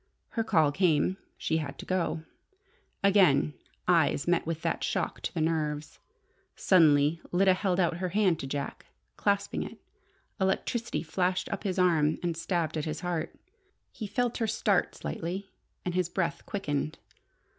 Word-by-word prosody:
Her 225 - -1
call 160 -9 +3
came. 175 +2 +2 0.2
She 160 - 0
had 145 -3 -4
to - - -8
go. 170 -3 -1 0.8
Again 180 -8 +5 0.3
eyes 165 -4 +3
met 175 -2 +2
with 165 -1 -3
that - - -1
shock - - -1
to - - -3
the 160 - -2
nerves. 155 -2 -1 0.6
Suddenly 155 -3 +4
Lyda 190 +1 +5
held 185 -1 0
out 170 -2 +2
her 185 0 -2
hand 190 -3 +2
to 135 - -4
Jack. 140 0 -4 0.3
Clasping 200 -1 0
it, - - -6 0.6
electricity 200 +4 0
flashed 180 +2 0
up - - -4
his 190 -2 -1
arm 160 -4 +3
and 170 -2 0
stabbed 165 -1 -1
at 150 - -2
his 155 0 -4
heart. 170 -3 -2 0.6
He 215 - -6
felt 240 +4 0
her 225 - +1
start 210 -2 +1
slightly, 185 +4 -5 0.3
and 180 - -1
his 180 -1 +1
breath 170 -3 -2
quickened. 155 -5 -2
175 Hz, 155 wpm, -29 LUFS, 155-190 Hz, 0.8 s, Again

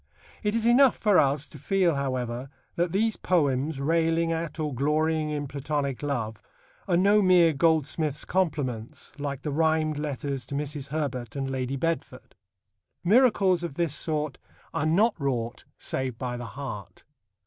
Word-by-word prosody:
It 210 0 0
is 230 -1 0
enough 250 +2 +5
for 205 -4 +4
us 140 +1 +1
to 150 - -12
feel, 185 +1 +2
however, 130 -2 -2 0.3
that 170 0 0
these 220 +3 +1
poems 145 -4 +1
railing 165 +2 +2
at 165 0 -3
or 150 -2 -1
glorying 155 +4 +1
in 145 -1 -3
Platonic 140 -1 -2
love 120 -7 -3 0.5
are 175 - +3
no 200 +3 +5
mere 180 -4 +5
goldsmith's 155 0 +1
compliments, 140 -11 -2
like 140 -2 -4
the 150 - -2
rhymed 155 0 +1
letters 140 -2 -3
to 140 - -5
Mrs. 145 -1 -3
Herbert 135 -5 -3
and 135 -1 -2
Lady 130 0 -2
Bedford. 155 -3 -3 0.7
Miracles 200 -4 +4
of 170 -5 -5
this 170 -3 0
sort 150 -3 -2 0.3
are 150 - 0
not 205 +8 +4
wrought 125 -4 -2
save 130 -3 -3
by 125 0 -3
the 120 0 -6
heart. 130 -8 -7
150 Hz, 150 wpm, -27 LUFS, 135-170 Hz, 0.7 s, enough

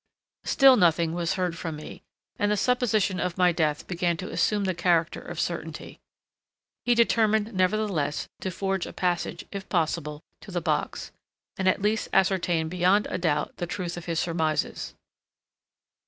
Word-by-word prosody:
Still 270 -3 +6
nothing 170 -3 +3
was 170 -1 -1
heard 180 -3 -1
from 165 -1 -5
me, 150 - -9 0.4
and 205 - +2
the 210 - +2
supposition 215 -5 +1
of 180 0 -2
my 180 -1 +4
death 155 -3 0
began 175 -1 -1
to 185 +4 -6
assume 210 -1 +1
the 190 -1 0
character 170 -2 +1
of - - -7
certainty. - - -4 0.9
He 245 - +4
determined, 220 -2 +2
nevertheless, 185 -6 0
to 190 - -3
force 195 0 -2
a - - -9
passage, 175 -1 -2
if 200 -1 -7
possible, 155 -3 -1 0.2
to - - -13
the - - -1
box, - - -2 0.4
and 190 - -1
at 190 - 0
least 215 +1 0
ascertain 175 -4 +2
beyond 185 +4 +2
a - - -2
doubt 150 -4 -1
the 175 - -3
truth 180 -1 -4
of 175 - -8
his 165 -2 -1
surmises. 160 -3 -1
180 Hz, 160 wpm, -26 LUFS, 170-200 Hz, 0.9 s, Still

